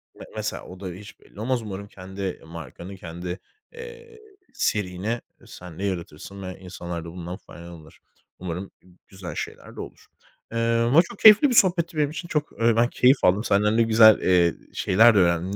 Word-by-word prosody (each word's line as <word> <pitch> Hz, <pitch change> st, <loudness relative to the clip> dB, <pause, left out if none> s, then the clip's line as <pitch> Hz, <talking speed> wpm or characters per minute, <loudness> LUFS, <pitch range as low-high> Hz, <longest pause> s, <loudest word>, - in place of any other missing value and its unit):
Me -, -, -11 dB
mesela -, -, -4 dB
o 90 Hz, -, -11 dB
da 95 Hz, -, -6 dB
hiç 100 Hz, +4 st, -13 dB
belli -, -, -17 dB
olmaz. 125 Hz, +2 st, -1 dB
Umarım 100 Hz, -2 st, -7 dB
kendi 95 Hz, -1 st, -7 dB
markanı, 85 Hz, +3 st, -9 dB
kendi, 90 Hz, +1 st, -7 dB, 0.3 s
eee, 470 Hz, -1 st, -11 dB, 0.3 s
serini 105 Hz, +2 st, -2 dB, 0.2 s
sen 90 Hz, -2 st, -12 dB
de -, -, -4 dB
yaratırsın 95 Hz, 0 st, -5 dB
ve 95 Hz, -1 st, -7 dB
insanlar 85 Hz, -2 st, -7 dB
da -, -, -7 dB
bundan 90 Hz, +1 st, -7 dB
faydalanır. 85 Hz, -5 st, -13 dB, 0.4 s
Umarım 90 Hz, +2 st, -6 dB
g -, -, -25 dB, 0.2 s
güzel 90 Hz, -5 st, -9 dB
şeyler -, -, -7 dB
de -, -, -10 dB
olur. -, -, -11 dB, 0.5 s
Eee, 115 Hz, -, -4 dB, 0.3 s
ama 145 Hz, +7 st, +6 dB
çok 170 Hz, -, -10 dB
keyifli 220 Hz, +6 st, +8 dB
bir 245 Hz, -, 0 dB
sohbetti 175 Hz, -4 st, +3 dB
benim 150 Hz, -2 st, +2 dB
için. 165 Hz, +3 st, -7 dB
Çok, 150 Hz, -3 st, -1 dB
eee, 115 Hz, 0 st, +4 dB
ben 115 Hz, +1 st, +3 dB
keyif 130 Hz, +2 st, +3 dB
aldım. 95 Hz, +4 st, +3 dB
Senden 105 Hz, 0 st, +2 dB
de 115 Hz, -, +5 dB
güzel, 110 Hz, -1 st, +6 dB
eee, 90 Hz, -2 st, +3 dB, 0.2 s
şeyler 110 Hz, +4 st, +4 dB
de -, -, +4 dB
öğrendim. 85 Hz, +2 st, +1 dB
100 Hz, 180 wpm, -24 LUFS, 90-120 Hz, 0.5 s, keyifli